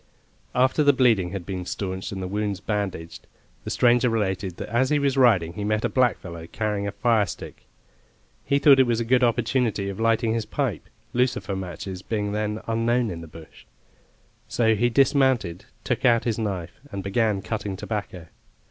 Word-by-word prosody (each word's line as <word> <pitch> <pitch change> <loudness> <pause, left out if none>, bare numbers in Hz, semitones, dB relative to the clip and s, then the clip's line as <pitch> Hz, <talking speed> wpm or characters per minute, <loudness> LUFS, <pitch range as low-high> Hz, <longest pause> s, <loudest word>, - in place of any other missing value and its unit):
After 130 +4 +3
the 145 0 +5
bleeding 115 -9 +3
had 95 -1 -6
been 95 -1 -4
stanched 95 0 -4
and 95 -1 -5
the - - -3
wounds 100 0 -2
bandaged, 100 -5 -4 0.4
the - - -5
stranger 120 0 +3
related 95 -4 -2
that - - -6
as 125 +4 +2
he 150 - +3
was 140 -2 +1
riding 105 -11 +4
he 100 - -5
met 105 +1 0
a - - +1
blackfellow 95 -10 -1
carrying 105 -2 -2
a - - -2
fire 110 -3 +2
stick. - - -9 0.8
He 140 - +1
thought 140 -1 +6
it 130 - +5
was 120 -1 +1
a 115 - -1
good 125 +2 +3
opportunity 115 -3 +1
of 100 +1 -6
lighting 115 0 +2
his 115 -1 -2
pipe, - - -3 0.2
lucifer 120 -5 0
matches 95 0 -6
being 105 0 -2
then 105 +1 -2
unknown 115 0 +1
in 85 -1 -6
the 85 - -9
bush; 80 0 -14 0.8
so 110 -2 +2
he 120 +3 +2
dismounted, 130 - +2 0.2
took 125 - -2
out 120 -3 +4
his 115 -2 -1
knife, 95 -6 -4
and 100 -1 -5
began 100 0 0
cutting 105 -3 -4
tobacco. 100 -5 -5
110 Hz, 180 wpm, -24 LUFS, 95-120 Hz, 0.8 s, thought